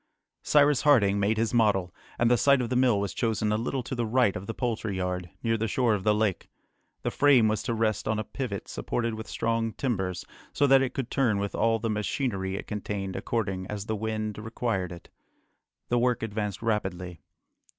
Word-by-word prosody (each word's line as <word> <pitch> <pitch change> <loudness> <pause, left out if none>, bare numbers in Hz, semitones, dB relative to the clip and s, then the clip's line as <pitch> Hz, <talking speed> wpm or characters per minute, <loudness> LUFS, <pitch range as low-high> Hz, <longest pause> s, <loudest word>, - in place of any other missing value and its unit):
Cyrus 145 -2 +4
Harding 105 -9 +4
made 105 +2 +1
his 115 +1 0
model, 100 -6 +2 0.2
and 120 0 +3
the - - +6
site 140 +3 +4
of 120 -1 -2
the - - +1
mill 125 -5 +3
was 100 -1 -2
chosen 110 -2 0
a - - +2
little 120 +4 -2
to 130 - -6
the 120 -3 -1
right 120 -3 +3
of 95 +2 -6
the 115 - -3
poultry 115 -5 -2
yard, 90 -1 -3
near 115 -1 +1
the 115 +1 -1
shore 120 +1 +2
of 100 -3 -2
the 105 +1 +3
lake. 105 -4 -1 0.5
The - - -1
frame 135 -6 +5
was 110 0 0
to 115 - -2
rest 110 -2 0
on 110 0 +1
a 110 - -1
pivot 110 -3 -5
supported 115 -1 -2
with 110 0 -7
strong 115 -1 -1
timbers, 95 -9 -2 0.3
so 145 - +3
that 135 -1 +6
it 130 -2 -2
could 135 -3 -3
turn 120 -7 +2
with 100 0 -2
all 115 0 +2
the 115 0 -2
machinery 105 -3 -2
it - - -5
contained 100 -2 -4
according 95 -5 -2
as 105 -1 -5
the 110 - -2
wind 110 0 -3
required 110 -4 -2
it. 85 -1 -11 0.8
The 120 - +2
work 120 -1 +1
advanced 105 -1 -3
rapidly. 90 -7 -2
110 Hz, 205 wpm, -27 LUFS, 100-120 Hz, 0.8 s, the